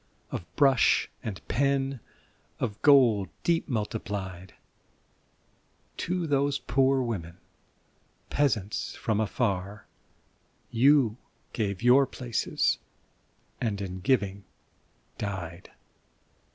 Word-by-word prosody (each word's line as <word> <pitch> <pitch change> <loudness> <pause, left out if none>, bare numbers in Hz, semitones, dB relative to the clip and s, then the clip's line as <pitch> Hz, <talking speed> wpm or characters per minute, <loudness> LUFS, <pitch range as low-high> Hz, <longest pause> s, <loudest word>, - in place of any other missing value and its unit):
Of - - -4
brush 135 -4 +4
and 105 -4 -7
pen, 135 0 0 0.6
of 105 -1 -3
gold 120 - +5
deep 170 -1 +1
multiplied, 100 -5 -4 1.4
To 180 -1 -1
those 140 -1 +1
poor 135 0 +2
women, 85 -8 -4 0.9
peasants 110 -8 0
from 110 -2 -1
afar. 105 -2 -1 0.9
You 125 -2 +4 0.4
gave 100 -2 -2
your 130 +3 +6
places, 120 -3 -1 0.8
and 105 -4 -1
in 95 -2 -5
giving 100 -2 0 0.8
died 90 -4 -5
110 Hz, 85 wpm, -28 LUFS, 100-135 Hz, 1.4 s, your